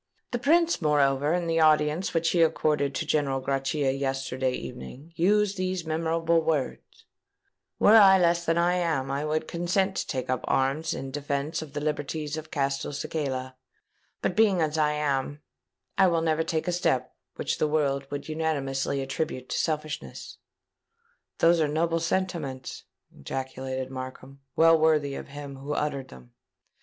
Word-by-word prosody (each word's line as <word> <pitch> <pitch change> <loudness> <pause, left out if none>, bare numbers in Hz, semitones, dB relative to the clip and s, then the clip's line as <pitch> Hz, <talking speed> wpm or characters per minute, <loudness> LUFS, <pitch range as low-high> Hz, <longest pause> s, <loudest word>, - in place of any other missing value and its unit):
"The 240 - -1
Prince, 330 - +3
moreover, 145 -1 +2
in 175 0 0
the 165 0 +1
audience 155 +2 +3
which 165 0 +1
he 175 - +2
accorded 150 -3 +1
to 160 - -2
General 145 -3 0
Grachia 135 +1 0
yesterday 135 -1 -2
evening, 95 - -8
used 205 +3 +2
these 185 -2 -2
memorable 165 +1 +1
words:—'_Were 160 +7 -1
I 190 -1 +8
less 170 -1 +2
than 165 0 +1
I 175 +1 +2
am, 155 -6 -1
I 140 +2 -1
would 155 +1 -1
consent 190 +3 0
to - - -2
take 130 -3 -3
up 130 -1 -1
arms 140 +5 0
in 135 0 -6
defence 145 +2 -2
of 150 -3 -9
the 145 - -3
liberties 150 0 -3
of 155 0 -7
Castelcicala; 140 -1 -2 0.7
but, 180 - 0
being 205 -4 +4
as 155 -2 0
I 150 -1 +2
am, 145 0 -2 0.6
I 190 - +6
never 165 -2 +1
will 160 - 0
take 160 +1 -2
a - - +2
step 130 -7 0 0.2
which - - -2
the 155 - +2
world 140 -3 0
would 145 0 -5
unanimously 140 -4 -1
attribute 135 -1 -4
to - - -2
selfishness._'" 155 -2 -4 1.0
"Those 170 0 +4
were 155 - +3
noble 165 +3 0
sentiments!" 165 -7 -3 0.3
ejaculated 130 - -5
Markham: 130 +1 -8 0.2
"well 165 0 +6
worthy 155 -3 +2
of - - -7
him 140 -1 -8
who 140 +2 -5
uttered 140 -3 -2
them." 60 -1 -15
150 Hz, 155 wpm, -27 LUFS, 135-165 Hz, 1.0 s, I